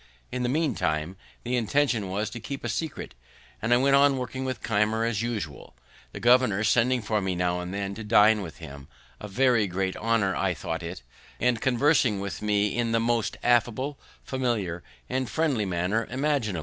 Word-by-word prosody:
In 125 - -3
the 120 - 0
meantime 90 - -1 0.3
the 125 +1 -1
intention 120 -3 +1
was 105 +3 -2
to 120 - -6
be - - -10
kept 140 -3 -5
a - - -1
secret, 130 +8 -4 0.5
and 110 - -1
I 120 - +6
went 135 +2 +4
on 140 -1 +5
working 130 +1 -4
with 130 -1 -4
Keimer 110 +1 +1
as 115 -2 -1
usual, 105 - -5 0.4
the - - -7
governor 120 -4 +4
sending 125 +1 +2
for 105 -1 0
me 95 -1 -1
now 90 0 0
and 90 0 -5
then 100 0 -3
to 110 +3 -7
dine 105 0 +5
with 85 -5 -8
him, 70 -4 -10 0.3
a 105 - -7
very 120 0 +2
great 95 +1 -2
honour 110 -4 +1
I - - 0
thought - - -4
it, - - -7 0.4
and 120 -1 +1
conversing 130 -4 +3
with 100 0 -5
me 105 -1 +1
in 115 -1 0
the 115 - +3
most 115 -1 0
affable, 120 +4 +1 0.2
familiar, 115 -10 -2 0.3
and 130 -2 -2
friendly 135 -5 0
manner 90 +6 -1
imaginable. 130 - 0
115 Hz, 190 wpm, -26 LUFS, 100-125 Hz, 0.5 s, I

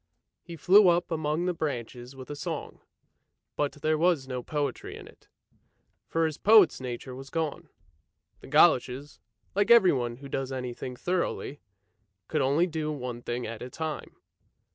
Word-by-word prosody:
He 170 - -9
flew 195 +5 +6
up 175 0 +2
among 155 +1 -1
the 180 - 0
branches 125 -4 -5
with 130 +1 -9
a - - -4
song, 145 - -5 0.8
but 145 -1 -1
there 155 0 +2
was 165 -6 +2
no 125 -1 -4
poetry 145 -1 -3
in - - -11
it, - - -19 0.8
for 165 0 +1
his 155 -2 -3
poet's 210 -9 +6
nature 125 0 -6
was 135 +1 -9
gone. 160 -2 -3 0.7
The - - -13
goloshes, 145 -2 +3 0.3
like 205 +2 +1
everyone 140 - +5
who 140 +3 -11
does 135 -1 -3
any 125 -2 -4
thing 125 +1 -7
thoroughly, 175 -2 -2 0.7
could 155 - 0
only 140 +6 +3
do 155 -3 -3
one 125 -4 -5
thing 120 0 -4
at 115 0 -6
a 125 - -6
time. 160 +2 -5
145 Hz, 160 wpm, -28 LUFS, 130-165 Hz, 0.8 s, flew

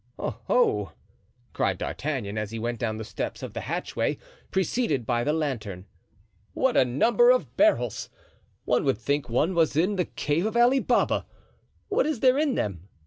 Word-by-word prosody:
"Oho!" 105 -2 0 0.6
cried - - 0
D'Artagnan, 100 +1 -3
as 105 -1 -3
he 115 - -6
went 120 +1 -3
down 110 -2 -2
the 110 - -5
steps - - -5
of - - -6
the - - -4
hatchway, - - -2 0.3
preceded 190 - 0
by 120 0 0
the 150 - +1
lantern, 115 - -3 0.7
"what 260 -1 +1
a - - +6
number 225 - +3
of - - +2
barrels! 320 +1 +2 0.6
one - - +2
would 135 -3 +1
think 140 +2 -1
one 150 +10 +1
was 160 -4 +2
in 190 +5 +2
the 180 - +1
cave 165 +7 -1
of 220 - -2
Ali 245 +3 +5
Baba. - - +1 0.6
What 430 0 +1
is 305 -6 -1
there 260 +1 +4
in 295 -4 +1
them?" 95 -3 -3
150 Hz, 170 wpm, -26 LUFS, -, 0.7 s, a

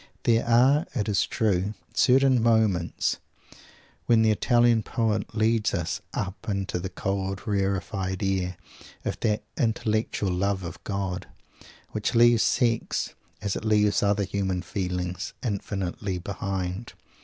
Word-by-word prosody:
There 115 -1 +3
are, 130 +7 +4
it 105 -5 -1
is 100 -2 +2
true, 100 -1 0 0.2
certain 130 -1 +4
moments 110 -7 +2 0.9
when 115 -1 +5
the 110 - +4
Italian 120 +1 +3
poet 110 -1 -1
leads 110 0 +2
us 85 -1 -2
up 95 +2 -4
into 100 -3 -1
the 95 +2 -4
cold 95 +1 -3
rarified 95 -1 -1
air 95 -2 -1 0.5
of - - -2
that 105 -2 0 0.2
"Intellectual 110 -5 0
Love 95 +1 0
of 85 - -8
God" 95 -2 -3 0.6
which 105 +3 -2
leaves 120 -1 +6
sex, 115 -2 +1 0.3
as 100 -2 -1
it - - -4
leaves 105 -1 +3
other 100 0 +2
human 95 -2 -2
feelings, 90 -1 -3
infinitely 100 -3 -3
behind. 95 +2 -4
100 Hz, 125 wpm, -26 LUFS, 95-115 Hz, 0.9 s, leaves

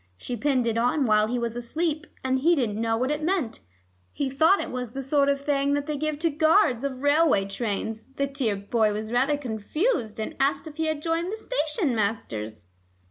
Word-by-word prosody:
She 245 - -4
pinned 255 +1 +1
it 230 0 0
on 250 +4 +2
while 215 -1 +4
he 245 +2 -1
was 235 -1 -2
asleep, 305 +6 -2 0.2
and 260 0 +1
he 335 +6 +4
didn't 225 -6 -1
know 225 0 +1
what 255 +4 0
it 300 +1 -1
meant. 325 -7 -1 0.5
He 275 -2 -2
thought 320 +8 +4
it - - -4
was 250 -2 -4
the 270 - -4
sort 280 +1 +2
of 280 0 +1
thing 280 -1 +1
that 285 0 0
they 300 -1 -2
give 305 +1 -2
to 330 - +3
guards 310 - +3
of 270 -1 -4
railway 285 -8 +4
trains. 220 +2 -3
The 280 - +1
dear 270 -6 -1
boy 210 +2 +1
was 215 +1 -4
rather 265 +4 +2
confused, 245 - -2
and 220 - -4
asked 275 +2 +1
if 310 -1 -10
he 320 0 0
had 310 -1 -2
joined 335 +2 -1
the 440 - -4
station 320 - -1
masters." 110 - -3
270 Hz, 210 wpm, -26 LUFS, 225-300 Hz, 0.5 s, while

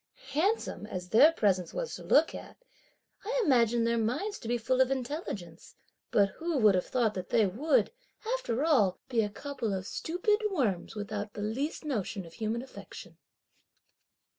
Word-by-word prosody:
Handsome 330 - 0
as 180 -3 -6
their 285 - +7
presence 190 - 0
was - - -3
to - - -7
look 315 +3 +4
at, - - -9 0.7
I - - -1
imagined 235 -4 +3
their 235 0 +1
minds 290 - -1
to - - -8
be 240 +1 +1
full 255 +3 +1
of 260 - +4
intelligence, 245 - -5 0.3
but 200 -1 +4
who 330 - -3
would 215 -5 +5
have 180 -1 0
thought 235 -4 +1
that 185 -2 -6
they 220 - +4
would, 285 - +1 0.4
after 285 - -1
all, 215 - +3
be 235 -3 +2
a 210 - -1
couple 230 -3 -4
of 185 -1 -4
stupid 365 - 0
worms, 225 - -1
without 210 0 -4
the 205 - -4
least 270 +10 -3
notion 210 - -3
of 165 - -13
human 225 +3 -2
affection!" 265 - -11
235 Hz, 165 wpm, -30 LUFS, 205-300 Hz, 0.7 s, their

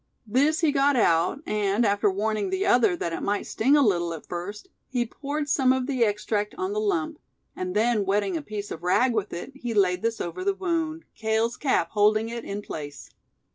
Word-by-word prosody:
This 280 +9 +2
he 320 -3 +3
got 280 0 +3
out, 180 - +2
and 210 +2 +1
after 205 0 +2
warning 210 - -1
the 380 +1 -1
other 230 - +4
that 170 -1 -3
it - - -4
might 205 0 -1
sting 270 +7 +3
a 290 - +5
little 175 -6 +1
at 155 - -11
first, 185 +4 -6 0.2
he 245 -2 0
poured 290 +5 -4
some 265 -2 +3
of 260 -1 +1
the 260 -3 +1
extract 210 0 -1
on 380 +1 -2
the 425 - -1
lump; 335 -7 -1 0.4
and 185 +1 -4
then 220 0 +2
wetting 195 -1 0
a 160 - -2
piece 205 +7 -6
of 160 - -6
rag 235 +8 +2
with 210 -3 -1
it, 175 +10 -6
he 240 -4 -4
laid 185 -3 +3
this 230 0 -1
over 175 - -4
the 400 0 +1
wound, 330 -4 -2
Cale's 220 +2 0
cap 275 - +1
holding 215 +1 +3
it 235 0 -5
in 205 +1 -5
place. 145 -5 -8
220 Hz, 210 wpm, -26 LUFS, 200-280 Hz, 0.4 s, a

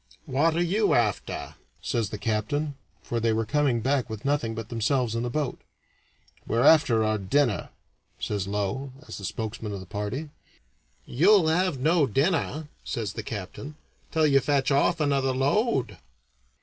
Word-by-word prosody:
"What 155 +5 +2
are 170 - +2
you 200 +5 +2
after?" 110 -5 -1 0.3
says 105 +6 -1
the 105 - -5
captain, 115 +8 -1 0.3
for 120 - -2
they 115 0 +1
were 110 0 0
coming 135 -1 +1
back 130 0 0
with 110 +1 -7
nothing 140 -6 0
but 115 0 -6
themselves 120 +1 0
in 115 - -1
the 120 - -2
boat. 145 0 -2 0.9
"We're 115 +2 +1
after 135 -8 +5
our 110 0 +1
dinner," 120 +3 +1 0.5
says 100 -2 -2
Low, 105 +7 -2
as - - -7
spokesman 110 +1 -4
of 100 - -5
the 95 - -9
party. 105 +11 -4 0.7
"You'll 175 - +4
have 180 -1 +1
no 155 +1 +3
dinner," 150 - 0 0.2
says 105 -5 -3
the 115 - -4
captain, 110 +8 -7 0.3
"until 160 -1 +2
you 140 -2 +5
fetch 140 0 +1
off 155 +5 +3
another 140 -3 +1
load." 135 - +1
130 Hz, 155 wpm, -26 LUFS, 110-150 Hz, 0.9 s, after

